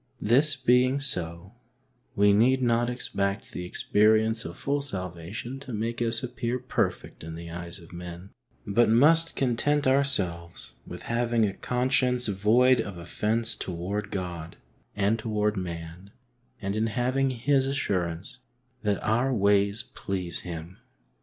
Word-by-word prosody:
This 140 +7 +4
being 130 +1 +3
so, 90 -7 -2 0.6
we 100 -1 +5
need 125 +6 +4
not 120 0 +2
expect 100 -5 -2
the 90 - -5
experience 110 +4 +2
of 85 +1 -7
full 140 +1 -1
salvation 95 +2 -5
to 130 -3 -8
make 115 +2 -2
us 115 0 0
appear 120 0 -2
perfect 125 -9 -2
in 80 0 -7
the 85 0 -8
eyes 85 0 -7
of 85 -2 -15
men, 90 +2 -8 0.3
but 115 +4 +3
must 160 +8 +4
content 140 +3 +1
ourselves 95 -12 0 0.2
with - - -8
having 115 -1 +1
a 100 - -2
conscience 125 +1 +1
void 110 +6 +4
of 100 -3 -7
offence 110 +6 -1
toward 95 +4 -4
God 85 -4 -5 0.4
and 105 +3 +1
toward 105 -1 0
man, 85 0 -6 0.5
and 100 -1 -3
in 110 +1 +1
having 130 +5 0
His 135 +2 +1
assurance 95 -6 -2 0.4
that 105 -2 +1
our 120 +5 +1
ways 100 -1 +2
please 90 -7 -3
Him. 85 0 -7
110 Hz, 135 wpm, -27 LUFS, 90-125 Hz, 0.6 s, we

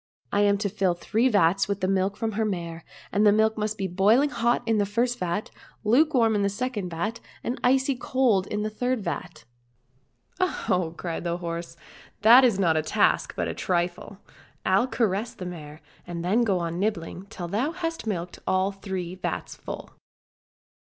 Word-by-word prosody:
I 205 - +2
am 200 0 +4
to 205 +1 -1
fill 190 -3 0
three 225 +8 +1
vats 195 -2 +3
with 200 -1 -2
the 185 - +1
milk 195 +1 +1
from 225 -1 -1
her 220 +1 -1
mare, 170 -5 -3 0.3
and 205 - +2
the 210 - +7
milk 220 +1 +3
must 215 0 -2
be 195 - -2
boiling 210 +10 +3
hot 235 0 +1
in 225 -2 +2
the 205 - +2
first 240 +4 0
vat, 180 +4 -2
and 210 - -7
lukewarm 255 -4 +4
in 205 - +1
the 200 - +2
second, 205 -3 -3 0.5
and 245 - -3
icy 265 +2 +3
cold 245 -6 +1
in 210 0 -2
the 215 - -2
third 245 0 -1
vat." 175 0 -5 0.3
— 125 +2 -41
" - - -36
Oh 370 - +4
ho! 185 - -1
" - - -24
cried 170 -2 -4
the 170 0 -1
horse, 170 -1 -5 0.2
" - - -24
that 240 +4 +9
is 235 -6 +4
not 170 -4 +3
a 155 - +2
task, 155 - +1
but - - -1
a - - -3
trifle. 175 +2 -2 0.5
I'll 195 +7 +3
caress 220 -2 -1
the 180 - -7
mare, 155 -3 -8 0.3
and 170 -1 -5
then 210 +7 +3
go 200 -5 +2
on 170 0 -3
nibbling 195 -2 -2
till 175 -3 -6
thou 220 - 0
hast 330 -7 -4
milked 180 -4 -3
all 190 +1 +2
three 190 -3 -5
vats 185 - -4
full." - - -8
200 Hz, 200 wpm, -26 LUFS, 180-225 Hz, 0.5 s, that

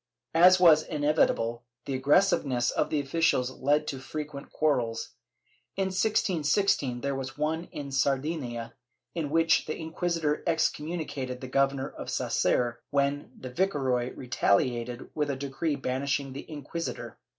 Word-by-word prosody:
» - - -54
As 185 0 +8
was 165 -4 +7
inevitable, 145 -7 +1 0.2
the 140 - -3
aggressiveness 135 -2 +3
of - - 0
the 150 - +1
officials 135 -3 +1
led 145 +3 +1
to 135 -3 -4
fre 135 +4 -5
quent 145 -2 -9
quarrels. 125 -7 0 0.7
In 190 -1 +1
1616 185 - +1
there 140 +1 -1
was 135 0 -5
one 160 +3 -1
in 140 -4 -7
Sardinia, 135 -4 -1 0.4
in 160 -4 -2
which 165 +2 +3
the 155 - -3
inquisitor 165 -2 -1
excommunicated 155 -5 -1
the 130 - -7
Governor 135 +1 +1
of - - -8
Sasser, 120 -1 +1
when 140 0 0
the 130 - -7
viceroy 130 -7 0
retahated 120 0 0
with 150 -1 -1
a 140 - 0
decree 140 +3 -2
banishing 135 0 -2
the 140 - -8
inquisitor. 145 -5 -5
140 Hz, 140 wpm, -28 LUFS, 130-160 Hz, 0.7 s, As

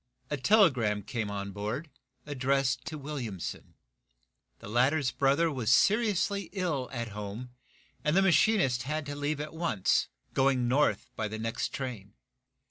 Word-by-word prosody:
A - - +1
telegram 130 - +3
came 110 0 -3
on 100 -1 -4
board, 110 - -4 0.3
addressed 135 -2 0
to 155 - -5
Williamson. 130 - -6 0.8
The - - -11
latter's 130 +5 +2
brother 140 +4 +2
was 125 -5 0
seriously 200 - +2
ill 165 -10 -1
at 120 -3 -4
home, 105 +4 -6 0.5
and 150 +4 +2
the 195 - +5
machinist 190 - +3
had 150 +4 -3
to 145 0 -5
leave 145 +1 -2
at 150 +1 -5
once, 160 - +1 0.3
going 130 -2 +2
north 125 -5 +1
by 110 - -2
the 110 +1 -5
next 115 +1 -2
train. 115 -6 -6
135 Hz, 140 wpm, -29 LUFS, 115-155 Hz, 0.8 s, the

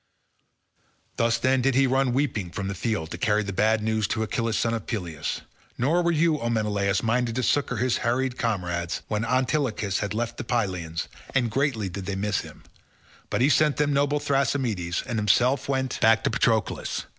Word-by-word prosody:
Thus, 115 0 +2
then, 130 +2 +2
did 135 0 +2
he 135 +1 +5
run 130 0 +2
weeping 120 -8 -1
from 95 +3 -4
the - - -2
field, 100 -4 -2
to - - -6
carry 105 -1 +2
the 100 -1 -4
bad 110 +2 +2
news 110 -1 0
to 110 - -1
Achilles 115 0 -1
son 115 - +1
of 115 -2 -4
Peleus. 85 - -3 0.4
Nor 155 +9 +2
were 170 - +1
you, 160 -1 +2
O 120 - -2
Menelaus, 105 -3 0
minded 115 0 0
to 130 - -1
succour 130 -1 +1
his 125 +2 +1
harassed 125 +1 0
comrades, 90 -8 -2
when 105 0 -1
Antilochus 125 -5 0
had 100 0 -3
left 115 +1 -2
the - - -4
Pylians—and 100 +2 -2
greatly 130 -5 0
did 95 +1 -6
they 100 - -2
miss 100 +1 0
him—but - - -9
he 135 - +5
sent 150 -1 +3
them 145 -1 +2
noble 145 +1 +2
Thrasymedes, 125 -11 0
and 120 -4 -2
himself 120 +7 +2
went 130 -1 -1
back 110 0 +4
to - - +1
Patroclus. 110 -2 0
115 Hz, 180 wpm, -25 LUFS, 105-130 Hz, 0.4 s, he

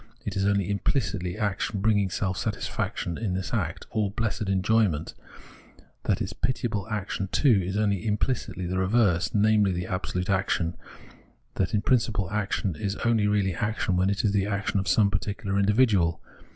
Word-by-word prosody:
is 100 0 0
only 100 -2 +1
implicitly 100 -4 -1
action 105 -1 -1
bring 105 +1 +3
ing 100 -2 0
self 95 0 -1
satisfaction 85 -1 -3
in 95 -5 -1
its 95 - -5
act, - - -2
or 105 -2 0
blessed 110 -1 -2
enjoyment; 95 -4 +1 0.9
that - - +1
its - - -5
pitiable 110 -6 -2
action 100 -2 -3
too 115 -1 +3
is 95 +3 -2
only 100 -2 +1
imflicitly 105 -3 -1
the 95 +1 -1
reverse, 95 -3 +2
namely, 100 -4 +3
absolute 90 -1 -3
action; 95 -3 0 0.8
that 95 +4 0
in 105 - 0
principle 110 -7 +1
action 100 -3 -1
is 100 +5 -3
only 115 -3 +3
really 100 -2 +1
action 105 0 -1
when 95 +2 +2
it 100 -1 -1
is 105 - +3
the 100 -1 +1
action 100 0 -1
of 95 - -3
some 100 +2 +4
particular 100 -1 -2
individual. 100 -5 +3
100 Hz, 160 wpm, -26 LUFS, 95-105 Hz, 0.9 s, some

